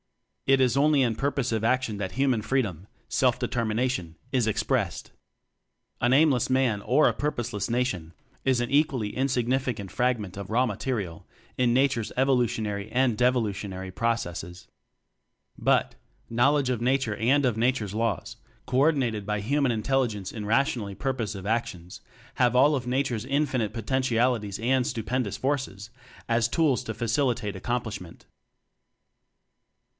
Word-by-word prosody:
It 135 0 +5
is 125 -2 +3
only 145 0 +4
in 120 -3 +1
purposive 125 -4 -1
action 120 -2 +1
that 95 -2 -4
human 130 -3 +1
freedom 100 - -1 0.2
self - - +2
determination 110 -6 -1 0.2
is 125 -4 +2
expressed. 110 - -1 0.9
An 120 - +3
aimless 135 -3 +4
man 130 -6 +2
or 135 +8 +4
a - - +2
purposeless 120 -8 -2
"nation" 110 -9 -1 0.3
is 130 -2 +2
an 120 - -1
equally 135 -7 +1
insignificant 125 -5 -1
fragment 120 -7 -1
of 100 -1 -6
raw 120 +4 +3
material 105 -7 -3 0.3
in 125 -2 +3
Nature's 130 -4 +1
Evolutionary 120 -6 0
and 125 -2 +2
Devolutionary 105 -6 0
pro 115 +5 0
cesses. 90 -3 -7 0.9
But, - - +2 0.4
knowledge 135 +3 +3
of 120 -2 -2
Nature 125 -3 +1
and 130 +6 +2
of 120 -4 +1
Nature's 115 -3 0
Laws 115 -3 -2 0.3
co 130 - 0
ordinated 135 -8 +2
by 105 0 -1
Hu 140 +9 0
man 135 -3 +3
Intelligence 115 -4 -1
in 110 -2 -5
rationally 110 -3 0
purpos 120 -6 -2
ive 95 - -8
actions, 100 -5 -3 0.3
have 125 -1 +2
all 145 +4 +5
of 125 -3 -4
Nature's 125 -3 0
in 140 +4 +1
finite 125 -7 -1
potentialities 120 -3 0
and 125 +2 +2
stupendous 115 -1 -2
forces 130 -7 -3 0.4
as 115 -1 +2
tools 135 -1 +2
to 110 - -3
facilitate 115 -2 0
accom 120 +6 -2
plishment. 100 -6 -8
120 Hz, 140 wpm, -26 LUFS, 105-130 Hz, 0.9 s, It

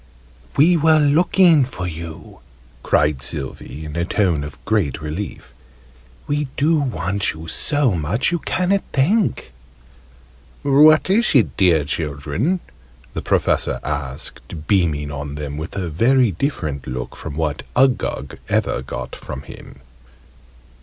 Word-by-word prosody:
"We 170 +5 +5
were 160 0 +5
looking 160 +1 +4
for 90 -8 -5
you!" 80 -1 -8 0.4
cried 75 -3 +2
Sylvie, 65 +2 -5
in 75 0 -7
a 85 - 0
tone 85 -5 +1
of 75 -1 -8
great 100 - 0
relief. 75 0 -6 0.7
"We 145 0 -1
do 155 +2 +3
want 100 - -1
you 80 +1 -10
so 145 - +2
much, 90 - 0
you 175 - 0
ca'n't 190 +4 0
think!" 170 - +1 1.1
"What 145 +1 +6
is 225 -4 +2
it, 125 - +3
dear 85 -7 +3
children?" 75 - -2 0.5
the - - -3
Professor - - +1
asked, 70 +4 -5
beaming 80 -7 +1
on 70 0 -5
them 75 -1 -5
with 80 +3 -6
a 95 -3 -2
very 115 - +3
different 80 - -3
look 65 -1 -5
from 80 -3 -7
what 75 -2 -2
Uggug 125 - +1
ever - - 0
got 65 - -6
from 65 +1 -8
him. 70 - -13
90 Hz, 130 wpm, -20 LUFS, -, 1.1 s, What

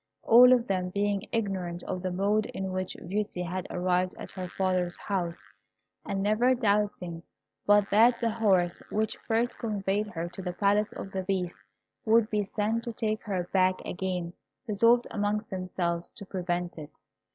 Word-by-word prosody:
All 245 +2 +8
of 245 -2 +4
them 185 -4 -1
being 200 +2 -1
ignorant 190 -6 -2
of 185 -1 -4
the 185 - -2
mode 200 +4 +1
in 190 0 -4
which 185 0 -3
Beauty 200 -1 -2
had 180 +1 -4
arrived 180 0 0
at - - -8
her 185 -2 -5
father's 185 -1 0
house, 175 - -3 0.6
and 195 0 -2
never 230 +5 +3
doubting 205 -7 0 0.5
but 205 -1 +5
that 230 +4 +5
the 230 -1 +1
horse 190 -6 +2
which 220 +1 -1
first 230 +1 0
conveyed 210 -2 -1
her 170 -4 -4
to 190 - -8
the 180 -1 -4
Palace 205 +3 +2
of 195 - -7
the 190 - -2
Beast 185 -2 -2 0.5
would 225 0 +3
be 210 -2 0
sent 220 +2 0
to 235 - -4
take 215 -1 -1
her 185 -4 -2
back 185 -1 +4
again, 180 -2 -3 0.3
resolved 230 +2 +4
amongst 210 0 -1
themselves 175 -2 -2
to 200 - -8
prevent 175 -2 -3
it. 150 -1 -11
195 Hz, 165 wpm, -28 LUFS, 180-215 Hz, 0.6 s, All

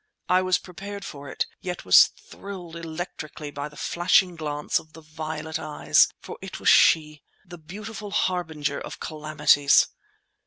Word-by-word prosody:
I 185 0 +4
was 185 -1 +2
prepared 200 +2 -8
for 140 -1 -8
it, - - -1
yet 180 -1 -6
was 90 - +8
thrilled 185 -4 -10
electrically 160 -2 -7
by 145 +1 -5
the 150 - -17
flashing 175 +1 +2
glance 150 -2 -1
of 155 0 -18
the 160 - -12
violet 155 0 -5
eyes—for 155 -1 +1
it - - -7
was - - +3
she—the 155 +3 +2
beautiful 205 +6 -8
harbinger 160 -7 -1
of - - -8
calamities! 150 -2 +3
160 Hz, 140 wpm, -25 LUFS, 150-180 Hz, -, was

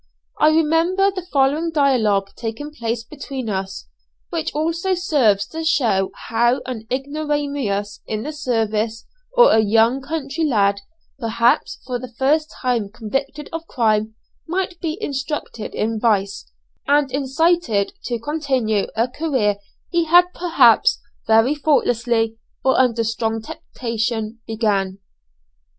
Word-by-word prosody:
I - - +6
remember 325 +5 +3
the 380 -1 -5
following 285 +4 +2
dialogue 225 -10 +2
taking 235 +6 -5
place 230 -3 -3
between 265 -3 -6
us, 190 - -4 0.4
which - - -2
also 330 +5 0
serves 265 - +2
to 325 0 -5
show 225 -11 +2 0.2
how 240 +3 +2
an 225 -4 -6
ignoramus 280 -7 -2
in 215 0 -3
the 300 +3 -5
science, 225 -5 -1 0.3
or - - +6
a - - +5
young 225 +5 +3
country 290 +2 -3
lad, 200 -8 +2 0.4
perhaps 235 0 +1
for 250 -1 -3
the 250 -1 -8
first 305 +4 +2
time 240 -5 0
convicted 270 +7 -4
of 330 0 -5
crime, 220 -2 +1 0.3
might 360 +1 -2
be 320 0 -2
instructed 275 -5 -4
in 220 0 -1
vice, 200 - 0 0.4
and 285 -1 +3
incited 280 - +1
to 240 - -1
continue 255 -6 -1
a 230 +2 +2
career 255 -8 0 0.3
he 340 -1 +2
had 350 +2 +6
perhaps 280 - +4 0.3
very 225 +5 +4
thoughtlessly, 240 -6 +1 0.3
or 265 - +4
under 235 -3 +3
strong 225 0 -1
temptation, 225 0 -4
began. 205 -4 0
250 Hz, 125 wpm, -21 LUFS, 220-300 Hz, 0.4 s, I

